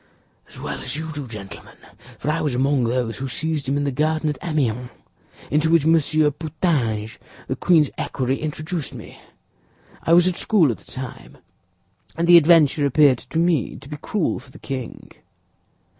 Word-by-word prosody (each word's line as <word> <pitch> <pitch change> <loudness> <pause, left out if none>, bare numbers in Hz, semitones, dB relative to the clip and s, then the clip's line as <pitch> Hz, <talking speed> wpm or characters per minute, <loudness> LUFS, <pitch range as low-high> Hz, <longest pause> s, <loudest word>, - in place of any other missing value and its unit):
"As - - -12
well - - -5
as - - -3
you 160 +1 -5
do, 145 -3 -6
gentlemen; 105 -4 -10 0.4
for 150 - -1
I 165 - -1
was 145 -5 -1
among 135 0 +2
those 120 -1 -1
who 135 - -3
seized 150 +1 -3
him 140 - +1
in 145 - 0
the 140 - 0
garden 155 +3 0
at 145 - -8
Amiens, 125 -7 -1 0.6
into 155 +2 +2
which 165 -3 +4
Monsieur 155 -1 +3
Putange, 145 - -2 0.3
the - - -2
queen's 160 -6 +3
equerry, 130 +1 -1
introduced 155 +1 -4
me. - - -11 0.8
I 165 - +2
was 175 +1 +6
at 180 - -1
school 175 - +3
at 115 - -6
the - - -15
time, 130 -2 -8 0.8
and 170 +1 -1
the 175 0 +9
adventure 155 -3 +5
appeared 140 -3 +4
to 160 - -7
me 165 -5 +1
to 135 - -12
be 150 +1 -7
cruel 170 +4 -1
for 130 +1 -16
the - - -14
king." 130 -4 -7
150 Hz, 175 wpm, -22 LUFS, 130-160 Hz, 0.8 s, the